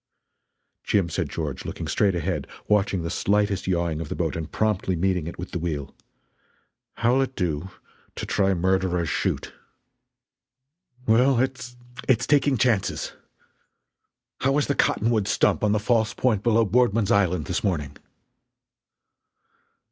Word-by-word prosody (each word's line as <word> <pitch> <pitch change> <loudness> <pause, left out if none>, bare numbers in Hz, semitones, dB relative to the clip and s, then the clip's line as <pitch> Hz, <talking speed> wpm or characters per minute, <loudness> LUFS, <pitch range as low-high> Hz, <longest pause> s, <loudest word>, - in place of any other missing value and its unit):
"Jim," 95 -5 +1
said - - -2
George, - - -4
looking - - -5
straight 100 -3 +2
ahead, 85 - -2 0.2
watching 100 -4 +1
the 85 - -3
slightest 100 -1 0
yawing 85 -3 0
of 80 - -6
the - - -3
boat 80 -3 -1
and 80 -1 -5
promptly 105 -4 0
meeting 90 -1 0
it 85 - -7
with 90 - -7
the 90 - -3
wheel, 75 -5 -4 1.0
"how'll 125 +3 +2
it 130 -1 -2
do 85 0 -2 0.5
to - - -4
try 95 -1 +1
Murderer's 90 -1 +1
Chute?" - - -2 1.5
"Well, 125 +4 +4
it's 125 -1 -3 0.3
it's 125 -2 +3
taking 145 -2 +3
chances. 115 -5 0 1.3
How 135 +1 +2
was 145 0 +2
the 140 - 0
cottonwood 110 -5 +1
stump 100 - +2
on 105 - +3
the 105 - +2
false 110 0 +1
point 115 -6 +1
below 115 0 +3
Boardman's 115 -1 +2
Island 90 -5 +2
this 90 - -2
morning?" 75 -8 -1
100 Hz, 140 wpm, -24 LUFS, 85-115 Hz, 1.5 s, Well